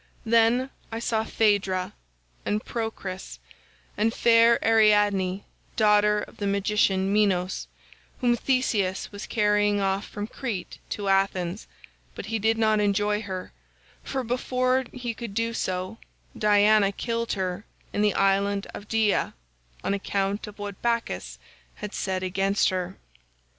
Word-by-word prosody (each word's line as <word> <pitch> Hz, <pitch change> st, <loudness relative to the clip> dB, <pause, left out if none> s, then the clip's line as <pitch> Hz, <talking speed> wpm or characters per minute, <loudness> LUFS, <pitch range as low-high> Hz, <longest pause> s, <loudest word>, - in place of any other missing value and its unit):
"Then 230 Hz, +3 st, +3 dB, 0.2 s
I 225 Hz, -, -3 dB
saw 230 Hz, -1 st, 0 dB
Phaedra, 200 Hz, -5 st, +1 dB, 0.5 s
and 210 Hz, +1 st, -1 dB
Procris, 220 Hz, -5 st, -5 dB, 0.6 s
and 220 Hz, +2 st, +2 dB
fair 230 Hz, 0 st, +5 dB
Ariadne 205 Hz, -4 st, +3 dB, 0.3 s
daughter 210 Hz, -1 st, +4 dB
of -, -, -10 dB
the 200 Hz, -, -2 dB
magician 200 Hz, -1 st, +1 dB
Minos, 190 Hz, -3 st, +1 dB, 0.5 s
whom 245 Hz, -2 st, +3 dB
Theseus 220 Hz, -7 st, 0 dB
was 205 Hz, +1 st, -7 dB
carrying 210 Hz, -1 st, +2 dB
off 195 Hz, 0 st, 0 dB
from 205 Hz, -, -5 dB
Crete 225 Hz, -4 st, -5 dB
to 205 Hz, -1 st, -4 dB
Athens, 195 Hz, -1 st, 0 dB, 0.5 s
but -, -, -6 dB
he 225 Hz, -1 st, -2 dB
did 225 Hz, +2 st, +2 dB
not 215 Hz, -1 st, +3 dB
enjoy 205 Hz, +1 st, +1 dB
her, 190 Hz, -4 st, -6 dB, 0.5 s
for 265 Hz, -1 st, -3 dB
before 255 Hz, +2 st, 0 dB
he 245 Hz, -2 st, -4 dB
could 225 Hz, -3 st, -7 dB
do 230 Hz, +1 st, 0 dB
so 185 Hz, +1 st, -3 dB, 0.4 s
Diana 210 Hz, -1 st, +4 dB
killed 230 Hz, +2 st, -2 dB
her 190 Hz, +1 st, -3 dB, 0.3 s
in 205 Hz, -, 0 dB
the 210 Hz, -1 st, +2 dB
island 195 Hz, 0 st, +2 dB
of 205 Hz, -, -9 dB
Dia 220 Hz, -2 st, +1 dB, 0.5 s
on -, -, 0 dB
account 200 Hz, +1 st, -2 dB
of 210 Hz, -, -11 dB
what 205 Hz, -2 st, -7 dB
Bacchus 95 Hz, -, -2 dB, 0.4 s
had 210 Hz, -, -7 dB
said 190 Hz, -1 st, -2 dB
against 195 Hz, +2 st, +1 dB
her. 185 Hz, 0 st, -3 dB
205 Hz, 130 wpm, -26 LUFS, 195-225 Hz, 0.6 s, fair